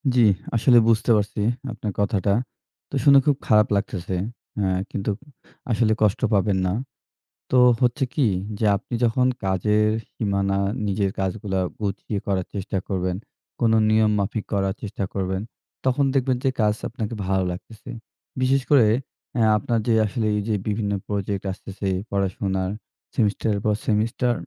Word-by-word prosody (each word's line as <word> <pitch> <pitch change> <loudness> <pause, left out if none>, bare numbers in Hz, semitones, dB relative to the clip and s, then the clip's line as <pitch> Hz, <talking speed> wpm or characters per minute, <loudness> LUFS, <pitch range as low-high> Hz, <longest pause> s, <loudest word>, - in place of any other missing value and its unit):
জি, 120 - +6 0.3
আসলে 120 +2 +5
বুঝতে 115 +1 +2
পারছি 105 0 -2 0.3
আপনার 105 -1 -4
কথাটা। 100 -1 +1 0.6
তো - - -5
শুনে 140 -1 +8
খুব 145 - +4
খারাপ 105 -1 +5
লাগতেছে। 95 -2 -2 0.4
এ্যা 95 -2 +1 0.2
কিন্তু 100 +1 -3 0.6
আসলে 110 0 +3
কষ্ট 105 +3 +2
পাবেন 100 0 +2
না। - - 0 0.8
তো 130 - +4 0.2
হচ্ছে 125 +3 +2
কি? 135 -6 +2 0.3
যে 110 - +1
আপনি 120 - -11
যখন 125 +2 +2 0.2
কাজের 105 +3 +2 0.3
সীমানা 100 -2 0 0.3
নিজের 100 -1 0
কাজগুলা 95 0 -1 0.2
গুছিয়ে 100 0 -2
করার 95 -2 0
চেষ্টা 100 0 -2
করবেন, 90 -2 -1 0.4
কোন 115 -2 +3 0.2
নিয়ম 110 0 +4
মাফিক 100 +2 -2
করার 95 -1 +1
চেষ্টা 100 -1 -4
করবেন, 95 -1 -1 0.4
তখন 135 +2 +2
দেখবেন 130 -2 +1
যে 135 - +3
কাজ 105 0 +3 0.2
আপনাকে 115 -2 -4
ভালো 95 0 +1
লাগতেছে। 105 +5 -10 0.5
বিশেষ 135 +1 +3
করে 140 -6 +6 0.5
এ্যা 110 - +4
আপনার 115 +2 0
যে 115 - +4
আসলে 110 +2 -2
এই 105 - 0
যে 105 - +2
বিভিন্ন 105 -1 -1 0.2
প্রজেক্ট 100 -1 -2
আসতেছে, 95 +1 -6 0.2
পড়াশোনার, 95 -1 -1 0.4
সেমিস্টারের 105 -1 +1
পর 105 - +3
সেমিস্টার 115 +3 +1
105 Hz, 145 wpm, -23 LUFS, 95-115 Hz, 0.8 s, শুনে